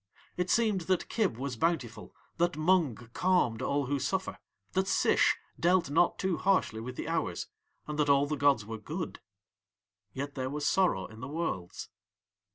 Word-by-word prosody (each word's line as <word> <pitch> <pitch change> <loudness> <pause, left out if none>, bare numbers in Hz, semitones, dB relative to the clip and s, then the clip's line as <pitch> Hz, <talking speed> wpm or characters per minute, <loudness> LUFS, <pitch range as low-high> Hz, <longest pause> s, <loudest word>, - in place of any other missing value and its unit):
It 180 0 -1
seemed 215 -5 +2
that 185 -2 +1
Kib 205 - 0
was 130 0 -3
bountiful, 130 -4 -2 0.2
that 175 -1 +1
Mung 160 -5 +3 0.2
calmed 180 -12 +2
all 140 0 0
who 140 +2 -1
suffer, 190 +8 -2 0.3
that 190 0 0
Sish - - +3 0.2
dealt 175 -3 +3
not 165 +3 +3
too 190 -3 0
harshly 185 - +1
with 125 +2 -6
the - - -5
hours, 160 - -1 0.4
and 150 0 -5
that 145 -1 +2
all 140 0 +5
the 150 +1 -2
gods 140 -7 +3
were 110 +1 -6
good; 160 - -5 0.9
yet 140 +5 -5
there 130 -1 -3
was 145 +1 -3
sorrow 185 - +2
in 110 - -12
the 125 - -6
Worlds. 140 - -4
150 Hz, 165 wpm, -30 LUFS, 130-180 Hz, 0.9 s, all